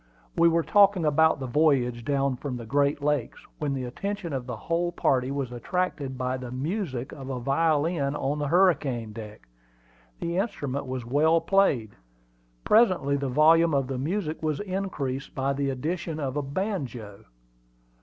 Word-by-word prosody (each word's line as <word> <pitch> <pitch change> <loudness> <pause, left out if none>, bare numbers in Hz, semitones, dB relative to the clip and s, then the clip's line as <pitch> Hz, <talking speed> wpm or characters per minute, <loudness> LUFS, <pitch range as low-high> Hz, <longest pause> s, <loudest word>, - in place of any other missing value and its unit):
We 170 0 +5
were 165 0 +2
talking 200 -3 +4
about 160 0 +3
the 135 - -4
voyage 125 -4 +2
down 140 0 0
from 130 -1 -4
the 115 - -8
Great 140 +4 +1
Lakes, 145 -5 -1
when 145 -2 -1
the 130 - -3
attention 190 +6 -4
of 130 -2 -4
the 125 - -4
whole 175 +1 -1
party 130 -6 +1
was 135 -3 -3
attracted 140 +1 -2
by 130 +1 -1
the 125 -1 -7
music 135 - -3
of 135 -2 -8
a 130 -2 -3
violin 145 +2 +1
on 145 +1 -1
the 145 - -1
hurricane 140 - +2
deck. 105 - -10 0.7
The 170 +1 -2
instrument 145 - -2
was 130 -2 -4
well 155 +6 +3
played. 165 - +2 0.7
Presently 185 -11 +3
the 140 -1 -2
volume 160 +3 +5
of 135 -1 +1
the 130 0 -4
music 160 +2 -2
was 155 -2 -1
increased 185 -9 -4
by 135 0 0
the 140 0 -1
addition 160 +4 -3
of 135 -2 -3
a 145 - 0
banjo. 135 - -4
140 Hz, 165 wpm, -26 LUFS, 130-165 Hz, 0.7 s, We